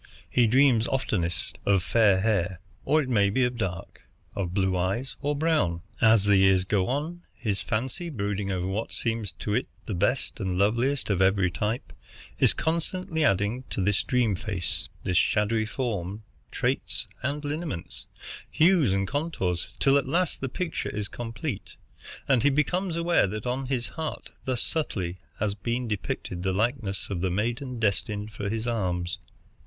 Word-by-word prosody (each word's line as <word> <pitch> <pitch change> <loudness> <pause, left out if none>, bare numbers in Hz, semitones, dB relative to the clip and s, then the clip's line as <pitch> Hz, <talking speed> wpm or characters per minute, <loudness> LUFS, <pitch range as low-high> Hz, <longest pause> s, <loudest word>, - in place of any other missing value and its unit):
He 120 -2 +4
dreams 125 -1 +5
oftenest 95 -10 -1
of 100 -3 +3
fair 100 -3 +4
hair, 95 -5 +1 0.3
or 155 0 +4
may 105 -6 +3
be 130 +6 +2
of 125 0 +1
dark, 90 -7 -4 0.3
of 95 -4 -2
blue 95 -1 +1
eyes 95 +9 -1
or 145 +1 0
brown. 140 - +1 0.2
As 110 -3 +6
the 100 -1 +5
years 95 -1 +5
go 95 -1 +1
on, 155 +7 -2
his 105 -6 -2
fancy, 130 +10 -2
brooding 100 -6 -2
over 90 -1 -1
what 100 +4 -2
seems 115 -3 -2
to 105 - -3
it 125 - +1 0.2
the 110 - -3
best 105 +10 0
and 95 -3 -1
loveliest 120 +6 +2
of 95 -1 +1
every 95 -1 +3
type, 105 +6 -2 0.5
is - - +5
constantly 165 0 -1
adding 105 0 +2
to - - -3
this 100 +1 +2
dream 125 -4 +2
face, 95 -2 -2
this 90 -1 +1
shadowy 110 +1 +2
form, 105 -4 -3 0.3
traits - - -1
and 145 +3 -2
lineaments, 150 - -4 0.4
hues 160 - +4
and 95 0 +1
contours, 105 - -1
till 140 0 +4
at 135 - -5
last 175 +4 0
the 135 - -2
picture 175 +4 -3
is 105 -1 -3
complete, 115 +1 -5 0.5
and 130 -4 +4
he 145 - +5
becomes 170 +5 +1
aware 170 -7 +3
that 105 +3 -5
on 130 +2 -1
his 125 -2 -1
heart 160 -1 -5
thus 130 -3 0
subtly 95 - -2 0.2
has 105 -1 0
been 120 +4 -2
depicted 95 -3 -3
the 95 +1 0
likeness 105 -2 -1
of 90 -3 -2
the 95 - +1
maiden 120 +6 -2
destined 105 0 0
for 100 -1 -4
his 110 +2 -2
arms. 90 -6 -1
110 Hz, 165 wpm, -27 LUFS, 95-135 Hz, 0.5 s, As